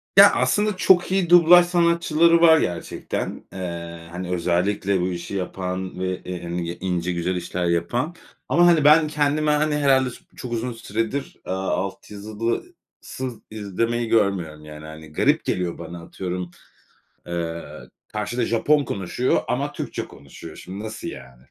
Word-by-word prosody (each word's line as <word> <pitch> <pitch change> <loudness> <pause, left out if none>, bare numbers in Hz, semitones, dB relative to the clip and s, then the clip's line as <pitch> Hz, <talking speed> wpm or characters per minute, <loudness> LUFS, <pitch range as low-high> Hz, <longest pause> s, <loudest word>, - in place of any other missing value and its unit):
Ya, - - +10
aslında 210 -2 +1
çok 185 -1 +4
iyi 190 -3 +1
dublaj 175 0 +8
sanatçıları 170 -1 +3
var 160 -1 +8
gerçekten. 85 - -3
Eee, 85 -2 -6
hani, 90 +1 -5
özellikle 90 +2 0
bu 90 - 0
işi 85 +2 -5
yapan 90 0 -4
ve, 95 0 -2
eee, 90 -1 -6
hani, 85 0 -3
y 85 - -5
ince, 90 -1 -1
güzel 90 +1 -1
işler 90 0 -3
yapan. 105 - -1 0.3
Ama, 170 +7 +5
hani, 165 -4 +5
ben 155 +2 +6
kendime, 150 0 +1
hani, 150 0 +2
herhâlde 135 -3 +3
s 120 - -10 0.2
çok 125 - -7
uzun 120 +2 -2
süredir, 115 +4 -3
aaa, 95 +1 -3
alt 95 +2 -3
yazısız 115 - -5 0.2
izlemeyi 115 +3 -2
görmüyorum, 90 -9 0
yani, 75 0 -10
hani, 80 0 -11
garip - - +2
geliyor 90 -2 -1
bana, 85 +1 -8
atıyorum, 90 0 -5 0.8
eee, 85 -1 -4 0.4
karşıda 110 +3 -2
Japon 145 +5 +2
konuşuyor 100 +6 -1
ama 140 +4 -1
Türkçe - - -4
konuşuyor. 70 0 -12
"Şimdi, 100 +4 -8
nasıl 110 0 -6
yani?" 65 -1 -11
100 Hz, 150 wpm, -23 LUFS, 90-145 Hz, 0.8 s, Ya